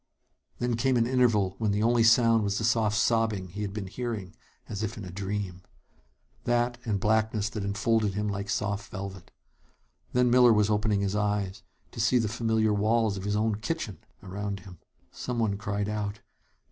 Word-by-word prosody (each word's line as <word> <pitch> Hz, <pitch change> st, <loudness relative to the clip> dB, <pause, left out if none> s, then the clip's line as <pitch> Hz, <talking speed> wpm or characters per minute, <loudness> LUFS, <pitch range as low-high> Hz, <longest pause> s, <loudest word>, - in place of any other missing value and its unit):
Then 120 Hz, -1 st, -1 dB
came 130 Hz, +1 st, +2 dB
an 115 Hz, -, +3 dB
interval 115 Hz, -7 st, +2 dB
when 110 Hz, -2 st, +1 dB
the 105 Hz, +2 st, +1 dB
only 120 Hz, +1 st, +3 dB
sound 115 Hz, -1 st, +5 dB
was 100 Hz, 0 st, 0 dB
the 110 Hz, -, -2 dB
soft 110 Hz, -2 st, +2 dB
sobbing 110 Hz, -5 st, +1 dB
he 100 Hz, +5 st, -6 dB
had 100 Hz, -1 st, -2 dB
been 105 Hz, -1 st, -5 dB
hearing 105 Hz, -3 st, -5 dB, 0.3 s
as 105 Hz, -, -5 dB
if 110 Hz, +2 st, -3 dB
in 105 Hz, -, -6 dB
a 90 Hz, -, -8 dB
dream. 95 Hz, -1 st, -4 dB, 0.8 s
That, 120 Hz, 0 st, +1 dB
and 105 Hz, -3 st, 0 dB
blackness 110 Hz, 0 st, +1 dB
that 105 Hz, -1 st, -4 dB
enfolded 105 Hz, 0 st, +1 dB
him 105 Hz, +1 st, -1 dB
like 100 Hz, 0 st, -3 dB
soft 105 Hz, -1 st, -2 dB
velvet. 95 Hz, -2 st, -7 dB, 0.8 s
Then 125 Hz, -1 st, +3 dB
Miller 125 Hz, -1 st, +7 dB
was 105 Hz, 0 st, +3 dB
opening 105 Hz, -1 st, +1 dB
his 100 Hz, 0 st, -1 dB
eyes, 105 Hz, -2 st, -1 dB, 0.3 s
to -, -, -9 dB
see 115 Hz, +3 st, +3 dB
the 115 Hz, -3 st, +1 dB
familiar 110 Hz, -1 st, +1 dB
walls 110 Hz, +1 st, +2 dB
of 95 Hz, 0 st, -6 dB
his 105 Hz, 0 st, 0 dB
own 110 Hz, 0 st, +1 dB
kitchen 110 Hz, -, -3 dB, 0.2 s
around 100 Hz, +1 st, -4 dB
him! 90 Hz, -3 st, -13 dB, 0.3 s
Someone 115 Hz, -5 st, -1 dB
cried 100 Hz, 0 st, -2 dB
out. 105 Hz, 0 st, -3 dB
105 Hz, 180 wpm, -28 LUFS, 100-115 Hz, 0.8 s, Miller